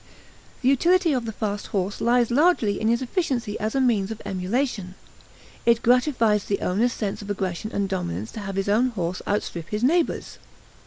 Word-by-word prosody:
The - - +2
utility 340 +4 +3
of 250 -3 -1
the 225 - -3
fast 210 -1 -3
horse 195 0 -2
lies 240 0 +3
largely 265 - +3
in 220 - +1
his 235 +3 +2
efficiency 250 - -2
as 215 +3 -2
a - - +2
means 225 -7 +2
of 225 - -6
emulation; 195 0 -2 0.7
it 235 -1 +3
gratifies 240 -4 +3
the 200 - -1
owner's 220 +7 +1
sense 210 -3 -3
of 205 - -9
aggression 195 +1 -3
and 200 -1 -1
dominance 110 - -3
to - - -7
have 195 -2 -5
his 195 0 -1
own 220 +5 +3
horse 180 -7 -3
outstrip 175 -5 -2
his 210 +2 -2
neighbor's. 330 +6 +1
220 Hz, 180 wpm, -24 LUFS, 195-250 Hz, 0.7 s, utility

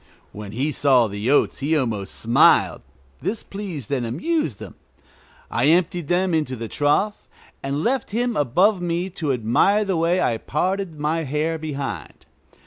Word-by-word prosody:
When 105 -1 -8
he 135 +6 -1
saw 135 -4 +4
the 105 +2 -3
oats 145 - +2
he 155 +3 +1
almost 110 -8 -2
smiled; 115 +2 +4 0.4
this 220 +1 -2
pleased 185 - -7
and 130 -3 0
amused 145 - -1
him. - - -9 0.8
I 120 +4 +1
emptied 170 0 +2
them 180 +1 +1
into 150 -5 0
the 115 -1 -6
trough, 150 - 0 0.3
and 140 +3 -2
left 260 0 0
him 235 +2 -1
above 180 - +2
me 175 +2 -2
to 155 -5 -2
admire 130 - +2
the 190 -3 0
way 170 +3 +2
I 115 -10 0
parted 180 - -2
my 155 +3 0
hair 155 +2 -1
behind. 145 -3 -6
155 Hz, 155 wpm, -22 LUFS, 130-185 Hz, 0.8 s, saw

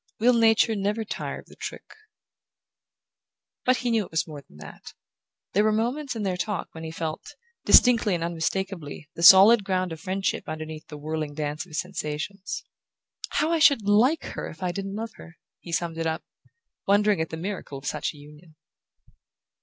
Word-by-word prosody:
"Will 245 +3 +5
Nature 225 -1 +4
never 205 +2 -1
tire - - -4
of - - -24
the - - -17
trick?" - - -8 1.7
But 255 0 +4
he 240 - +2
knew 225 -2 +2
it - - -15
was 160 +1 0
more 150 -4 -9
than 75 - -20
that. - - -12 0.6
There 205 - +4
were 215 - +3
moments 245 +5 -1
in 220 - -3
their 185 -2 -1
talk 205 +1 -3
when 160 - -9
he 160 - -5
felt, 160 -1 -5 0.3
distinctly 230 -6 +6
and 165 - -3
unmistakably, 170 -2 -3
the - - -8
solid 195 +5 +9
ground 185 -2 -1
of 160 - -6
friendship 190 -1 -2
underneath 155 0 -6
the 150 - -9
whirling 155 0 -4
dance 150 +2 -3
of - - -18
his 155 -2 -1
sensations. 180 +2 -5 0.7
"How 315 - +1
I 335 - +2
should 280 -9 +5
like 240 +10 +4
her - - -5
if 165 +4 -10
I 180 - 0
didn't 195 +1 -5
love 225 +1 -4
her!" 165 - -13 0.2
he 170 - -10
summed 170 -1 -2
it 165 - 0
up, 160 +1 -2 0.6
wondering 205 -2 +3
at 160 - -2
the 160 - -6
miracle 180 -5 -5
of 135 - -12
such 150 0 -2
a - - -16
union. 150 +2 -16
185 Hz, 185 wpm, -26 LUFS, 160-210 Hz, 1.7 s, solid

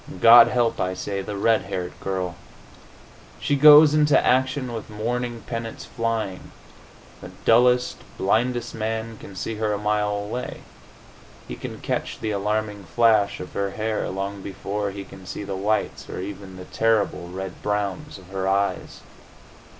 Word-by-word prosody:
God 115 +3 +9
help, 120 -1 +1
I 95 0 -1
say, 100 +1 -3
the 100 +1 -5
red 115 +2 +3
haired 90 -2 -5
girl! 95 -2 -3 1.0
She 145 - 0
goes 150 +1 +8
into 150 -1 +4
action 130 0 +1
with 115 -1 -6
warning 120 +2 -3
pennants 115 -1 -6
flying. 115 -5 -3 0.7
The - - -9 0.2
dullest, 125 +2 +4 0.2
blindest 120 +4 0
man 110 0 -4
can 100 - -11
see 115 - -4
her 105 -1 0
a - - -1
mile 105 0 0
away; 105 +5 -5 0.9
he - - -6
can - - -7
catch - - -3
the 110 - -2
alarming 105 0 -2
flash 110 +1 +3
of 90 - -8
her 100 0 -1
hair 110 +2 -2
long 100 +1 -4
before 100 +1 -4
he 100 0 -7
can 95 -1 -13
see - - -5
the 100 -1 -4
whites, 105 +3 -1
or - - -5
even 95 0 -7
the 90 0 -9
terrible 110 -6 0
red 95 0 -7
browns, 105 +8 -2
of 95 -1 -15
her 95 0 -3
eyes. 100 +1 -1
105 Hz, 155 wpm, -24 LUFS, 100-115 Hz, 1.0 s, God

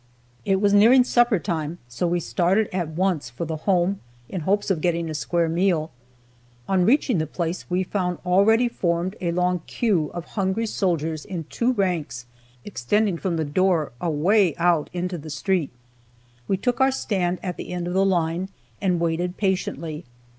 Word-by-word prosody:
It 195 -1 +2
was 200 0 +3
nearing 235 +5 +7
supper 240 -3 +3
time, 160 0 -3
so 120 +9 -2
we 175 +1 +1
started 185 +5 +1
at 180 -3 -1
once 160 -5 -1
for 120 +8 -5
the 160 0 -4
Home, 185 +1 +2 0.3
in 185 - -4
hopes 200 +5 +1
of 170 -5 0
getting 170 -1 0
a - - -4
square 170 +2 0
meal. 165 -1 +1 0.8
On 185 -2 +2
reaching 255 - +3
the 155 - -1
place 170 +3 -4
we 180 +1 +1
found 180 -2 -2
already 210 +7 +4
formed 175 -3 -1
a 170 -2 0
long 180 0 0
"queue" 185 -11 0
of 175 -1 -5
hungry 200 +2 -1
soldiers, 165 -7 -1
in 175 -4 -5
two 245 +2 +1
ranks, 170 - -2 0.4
extending 195 - 0
from 180 -4 -1
the 160 - -1
door 170 +1 +1
away 175 +3 +2
out 170 -3 +2
into 180 0 -3
the 155 +2 -9
street. 170 0 0 0.8
We 195 - +1
took 245 +6 -1
our 265 0 +5
stand 185 -8 -1
at 180 -2 -4
the - - -7
end 180 -1 -3
of 175 - -3
the 190 +1 +3
line, 175 -1 0 0.3
and 180 -3 +1
waited 170 +2 -1
patiently. 170 -5 -2
180 Hz, 175 wpm, -23 LUFS, 165-195 Hz, 0.8 s, nearing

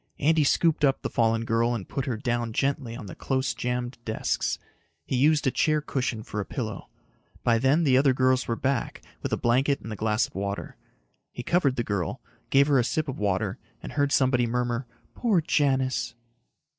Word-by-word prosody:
Andy 155 +1 +3
scooped 160 +2 +2
up 135 -2 +2
the - - -3
fallen 115 -1 +1
girl 115 +1 +1
and 100 -5 -6
put 135 - -3
her 120 -4 -1
down 120 -1 -2
gently 135 -2 -1
on 110 - -8
the 95 - -8
close 130 -3 -1
jammed 125 0 -3
desks. 110 -1 -1 0.5
He - - -2
used 150 +4 +3
a 130 - +3
chair 155 +3 +2
cushion 125 -6 -2
for 105 - -5
a - - 0
pillow. 110 0 -5 0.5
By 115 -1 +3
then 135 +7 +3
the 130 -4 +4
other 135 0 +4
girls 130 0 +2
were 115 - 0
back 130 0 -2 0.2
with - - -3
a - - +1
blanket 135 +4 +2
and 115 - -8
the - - -3
glass 105 +1 +1
of - - -14
water. 100 +1 -4 0.6
He 125 - -7
covered 150 -6 +2
the 120 - -1
girl, 100 -6 -2 0.3
gave 140 +1 +5
her 140 -3 +4
a - - +3
sip 155 +6 -1
of 135 - -5
water 100 -3 -1 0.2
and - - -6
heard 145 -1 +1
somebody 125 -3 +3
murmur, 120 +1 -1 0.3
"Poor 220 -7 +2
Janis." 130 -6 +1
125 Hz, 195 wpm, -26 LUFS, 115-140 Hz, 0.6 s, gave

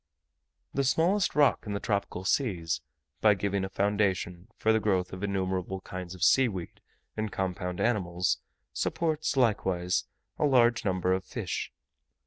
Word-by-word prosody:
The 140 - +1
smallest 175 +8 +2
rock 145 -2 +4
in 105 - -2
the 100 - -1
tropical 100 -3 -2
seas, 85 - 0 0.4
by 105 -2 +6
giving 100 0 -1
a 95 - -3
foundation 95 -2 0
for 110 - +3
the 110 - +3
growth 95 -4 0
of 95 - -6
innumerable 95 -1 -1
kinds 90 -1 -7
of 90 - -4
sea 130 +6 +6
weed 95 -6 -6 0.3
and 110 -1 -2
compound 90 -1 -3
animals, 90 -6 +1 0.3
supports 155 -3 -1
likewise 95 -7 +1 0.3
a - - +3
large 120 -4 +4
number 95 -2 +1
of 95 0 -1
fish. - - -4
100 Hz, 145 wpm, -29 LUFS, 90-115 Hz, 0.4 s, by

